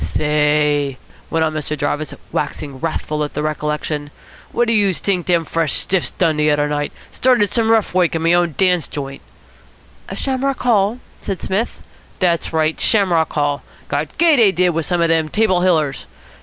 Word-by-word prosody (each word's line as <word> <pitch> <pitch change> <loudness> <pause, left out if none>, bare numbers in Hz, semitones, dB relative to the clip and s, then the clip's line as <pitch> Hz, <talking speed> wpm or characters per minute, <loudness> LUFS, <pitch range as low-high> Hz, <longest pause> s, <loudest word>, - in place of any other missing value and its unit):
"Say," 150 -2 +1 0.3
went 160 0 +1
on 155 - -2
Mr. 155 0 -3
Jarvis, 150 +2 -2 0.2
waxing 145 -2 -4
wrathful 155 -1 -2
at 145 - -6
the 150 - -2
recollection, 150 -1 -3 0.4
"what 240 0 +1
do 230 - +2
youse 200 -7 +2
t'ink 180 +1 -1
dem 170 -2 +2
fresh 165 -2 0
stiffs 190 -2 +1
done 160 -4 0
de 150 0 +2
udder 145 0 +2
night. 145 0 -2 0.2
Started 245 -6 +2
some 225 -2 +1
rough 225 -4 +2
woik 180 -2 +2
in 165 - -2
me 165 +1 +4
own 175 -4 +1
dance 180 -3 +2
joint." 135 -1 -6 0.9
"Shamrock 270 0 -2
Hall?" 220 -2 +2 0.2
said 195 -3 -4
Psmith. 205 +5 -3 0.3
"Dat's 170 -3 0
right. 160 -1 0
Shamrock 180 -7 +2
Hall. 145 -1 0 0.3
Got 145 +1 -3
gay, 325 -2 +5
dey 220 -5 +5
did, 180 0 +2
wit 165 -2 -1
some 175 -2 0
of 170 - +2
de 160 -1 +1
Table 190 -1 +2
Hillers. 155 -6 +1
165 Hz, 175 wpm, -18 LUFS, 150-190 Hz, 0.9 s, gay